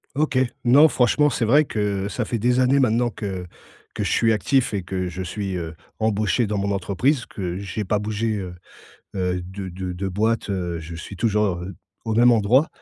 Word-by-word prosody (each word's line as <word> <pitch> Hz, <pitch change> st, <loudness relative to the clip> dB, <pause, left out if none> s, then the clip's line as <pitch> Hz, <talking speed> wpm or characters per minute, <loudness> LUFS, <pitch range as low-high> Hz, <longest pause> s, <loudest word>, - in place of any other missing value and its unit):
OK, 145 Hz, -2 st, +1 dB, 0.3 s
non 140 Hz, +6 st, +7 dB
franchement, 135 Hz, +4 st, +3 dB
c'est 120 Hz, -, -1 dB
vrai 145 Hz, +7 st, +5 dB
que 100 Hz, -6 st, -2 dB
ça 120 Hz, +2 st, -2 dB
fait 115 Hz, -, -2 dB
des 125 Hz, +3 st, +2 dB
années 130 Hz, +2 st, +4 dB
maintenant 120 Hz, -1 st, +2 dB
que 100 Hz, -5 st, -5 dB, 0.5 s
que -, -, -3 dB
je -, -, -1 dB
suis 115 Hz, -1 st, +3 dB
actif 130 Hz, +3 st, +1 dB
et 100 Hz, -3 st, -2 dB
que 90 Hz, 0 st, -3 dB
je 90 Hz, +1 st, -5 dB
suis, 95 Hz, +1 st, -4 dB
heu, 80 Hz, -2 st, -5 dB, 0.2 s
embauché 110 Hz, +2 st, +1 dB
dans 105 Hz, 0 st, -2 dB
mon 100 Hz, +1 st, -1 dB
entreprise, 115 Hz, -, 0 dB
que 90 Hz, -3 st, -5 dB
j'ai 100 Hz, +2 st, -4 dB
pas 105 Hz, +3 st, +1 dB
bougé, 110 Hz, +1 st, -1 dB
heu 90 Hz, -2 st, -5 dB, 0.6 s
heu, 90 Hz, -1 st, -1 dB
de 95 Hz, +2 st, -7 dB
de 90 Hz, 0 st, -5 dB
de 95 Hz, +2 st, -3 dB
boîte. 110 Hz, +3 st, 0 dB
Heu, 90 Hz, -3 st, -2 dB
je 85 Hz, +1 st, -8 dB
suis 85 Hz, +4 st, -8 dB
toujours, 105 Hz, -2 st, +1 dB
heu, 95 Hz, +2 st, -7 dB, 0.3 s
au 110 Hz, -, -2 dB
même 120 Hz, +2 st, +6 dB
endroit 120 Hz, +6 st, +4 dB
105 Hz, 200 wpm, -23 LUFS, 95-120 Hz, 0.6 s, non